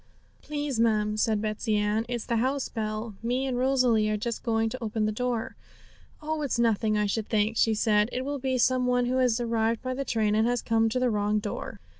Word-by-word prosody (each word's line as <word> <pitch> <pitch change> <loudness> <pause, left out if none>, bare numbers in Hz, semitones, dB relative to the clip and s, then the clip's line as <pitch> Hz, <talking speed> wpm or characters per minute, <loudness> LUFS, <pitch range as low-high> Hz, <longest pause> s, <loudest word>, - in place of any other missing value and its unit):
'Please, 290 -4 -3
ma'am,' 215 -2 +2
said 215 0 +1
Betsey 215 +1 -1
Ann, 210 +2 0
'it's 240 -2 -3
the 235 - 0
house 260 +3 0
bell; 215 0 -4
me 250 +3 -1
and 260 -2 -2
Rosalie 250 -5 +3
are 215 - 0
just 235 +2 -3
going 225 -1 +1
to 255 +2 -6
open 220 -1 -1
the 215 - 0
door.' 240 0 -2 0.7
'Oh, 310 0 -2
it's 280 -5 -1
nothing, 220 -2 +2
I 210 - +1
should 210 +1 -2
think,' 215 0 +1
said 215 -1 +3
she; - - -4
'it 255 - -2
will 285 0 -3
be 260 0 -1
some 255 0 +2
one 245 0 +2
who 255 +1 0
has 250 -2 +2
arrived 230 -1 0
by 255 0 -2
the 275 +2 -3
train, 220 -5 0
and 220 +2 +3
has 245 -1 0
come 225 0 +2
to 255 - -1
the 250 -1 +1
wrong 210 0 +1
door.' 210 - -5
230 Hz, 225 wpm, -27 LUFS, 215-250 Hz, 0.7 s, Rosalie